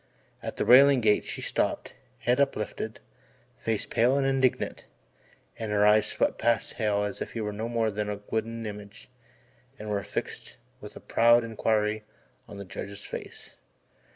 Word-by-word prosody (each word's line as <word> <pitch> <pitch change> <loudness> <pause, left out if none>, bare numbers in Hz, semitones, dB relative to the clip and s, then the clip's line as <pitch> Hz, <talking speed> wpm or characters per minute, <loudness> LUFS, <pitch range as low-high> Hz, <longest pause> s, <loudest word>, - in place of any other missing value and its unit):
At - - -6
the - - 0
railing 135 +2 +7
gate 105 -3 +2
she - - -5
stopped, - - -1 0.2
head 125 +2 +1
uplifted, 110 -4 -2 0.6
face 110 -3 -1
pale 125 +4 +2
and 140 - +1
indignant; 135 -2 0 0.7
and 110 -2 -3
her 105 0 +3
eyes 105 0 +5
swept - - -1
past 115 -1 +1
Hale 105 -3 0
as 100 -1 -4
if - - -5
he 115 - -3
were 105 -1 -3
no 110 +3 -4
more 115 -2 0
than 105 0 -3
a 105 -1 -4
wooden 115 +1 -2
image, 105 0 -9 0.7
and 105 0 -6
were 100 -1 0
fixed - - -6 0.2
with - - -10
proud 120 +1 +5
inquiry 110 -1 0 0.4
on 100 - -10
the 100 - -7
Judge's 100 +2 -7
face. - - -9
110 Hz, 160 wpm, -27 LUFS, 105-115 Hz, 0.7 s, railing